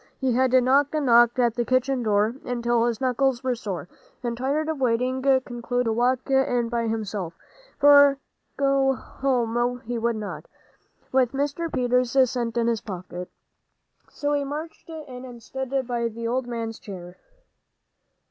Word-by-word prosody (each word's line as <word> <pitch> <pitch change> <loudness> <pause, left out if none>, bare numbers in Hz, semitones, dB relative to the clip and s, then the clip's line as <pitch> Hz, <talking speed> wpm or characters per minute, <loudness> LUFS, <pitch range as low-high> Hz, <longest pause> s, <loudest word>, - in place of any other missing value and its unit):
He 265 -2 +1
had 255 +1 +2
knocked 265 +4 +3
and 300 -2 0
knocked 240 0 +5
at 240 -2 +3
the 240 - -1
kitchen 255 +1 +1
door 215 0 +2
until 240 -1 0
his 235 -2 -2
knuckles 260 0 +1
were 255 -1 +1
sore, 205 -7 -5 0.4
and 235 -1 -2
tired 280 +5 -1
of 315 -4 -3
waiting, 255 +2 +1
concluded 250 -2 0
to 225 - +1
walk 250 +2 +1
in 250 -3 +2
by 235 -1 -1
himself; 205 -6 -3 0.4
for 285 -1 +7 0.4
go 275 -1 +3
home 245 -2 -1
he 235 +1 -4
would 235 0 0
not, 185 -8 -6 0.6
with 255 -2 +2
Mr. 290 +4 -2
Peters' 250 +1 +1
cent 240 -2 -2
in 235 - +2
his 230 -2 0
pocket. 180 -2 -7 0.8
So 290 0 -2
he 285 -1 +1
marched 305 +4 -7
in 290 -6 -8
and 240 -3 -11
stood 265 +2 -5 0.2
by 235 -1 -1
the 230 +1 -5
old 250 +1 -1
man's 230 -2 -4
chair. 180 -3 -9
245 Hz, 155 wpm, -25 LUFS, 230-265 Hz, 0.8 s, for